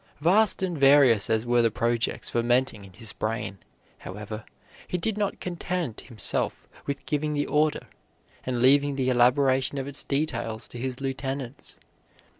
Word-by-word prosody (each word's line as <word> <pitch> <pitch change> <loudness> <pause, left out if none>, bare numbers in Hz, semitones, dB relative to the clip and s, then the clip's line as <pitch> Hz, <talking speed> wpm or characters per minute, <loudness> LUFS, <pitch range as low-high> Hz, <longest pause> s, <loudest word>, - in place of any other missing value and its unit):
Vast 190 +6 +4
and 180 -2 -1
various 135 -6 +5
as 110 +1 +1
were 120 0 +3
the 115 - +3
projects 115 +2 -1
fermenting 120 -2 +1
in 95 -1 -14
his 110 +2 -7
brain, 110 -3 -3 0.4
however, 105 +3 -7 0.4
he 180 - -2
did 215 +4 -1
not 205 -1 -2
content 175 -7 -3
himself 115 -5 -2 0.2
with 140 0 -4
giving 150 0 -1
the 145 - 0
order, 150 0 +1 0.6
and 125 -1 -1
leaving 140 +2 +5
the 130 -1 +1
elaboration 130 +2 +3
of 135 - -2
its 140 0 -5
details 120 -6 -2
to 120 - -8
his 130 +1 -3
lieutenants. 135 -1 -5
130 Hz, 150 wpm, -26 LUFS, 115-145 Hz, 0.6 s, various